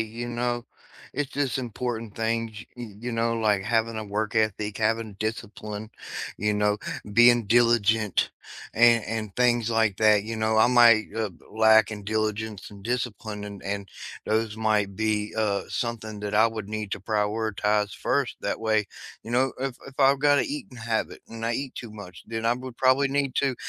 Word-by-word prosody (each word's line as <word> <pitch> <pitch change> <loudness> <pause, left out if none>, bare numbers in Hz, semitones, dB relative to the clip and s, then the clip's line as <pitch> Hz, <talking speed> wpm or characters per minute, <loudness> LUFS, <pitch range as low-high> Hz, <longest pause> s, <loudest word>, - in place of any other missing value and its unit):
you 115 +2 -4
know, 120 0 -2 0.5
it's 145 -2 -2
just 140 -3 -1
important 115 -3 -4
things, 115 0 -1 0.2
y 120 - -6
y 105 - -13
you 120 +1 -4
know, 115 0 +1
like 105 -3 +2
having 115 +1 0
a 110 - -3
work 105 +2 -2
ethic, 105 -2 0
having 110 -1 0
discipline, 110 0 -5 0.5
you 105 +1 0
know, 105 0 +2 0.4
being 120 -1 +6
diligent. 115 -2 +3 0.4
And 115 -1 +5
and 110 -2 -4
things 120 -2 +3
like 110 -3 +2
that, 105 -2 +5
you 115 +2 -5
know, 110 0 +1
I 110 +2 +6
might, 120 -3 +6
uh, 110 -1 -1 0.2
lack 110 -1 +5
in 105 -2 -6
diligence 110 0 -2
and 100 -1 -13
discipline 110 -3 -3
and 100 -1 -8
and 100 0 -3 0.4
those 110 0 0
might 105 -3 +1
be, 105 -1 -1
uh, 105 -2 +1
something 110 -3 -4
that 105 0 -3
I 110 +2 +6
would 110 -3 -5
need 105 -1 -4
to - - -3
prioritize 105 0 0
1st, 135 -2 -1
that 100 - -2
way, 110 -2 +1 0.4
you 115 - -9
know, 130 +2 +2
if 135 -2 -2
if 135 - -11
I've 135 0 +5
got 145 -1 +5
an - - +1
eating 280 - -6
habit 115 0 -2
and 115 0 -7
I 115 - 0
eat 135 +2 -3
too 120 - -7
much, 100 -5 -10
then 115 0 -3
I 120 - +3
would 125 -1 -8
probably 130 +2 +4
need 140 -1 0
to 135 -2 +2
110 Hz, 180 wpm, -26 LUFS, 105-120 Hz, 0.5 s, being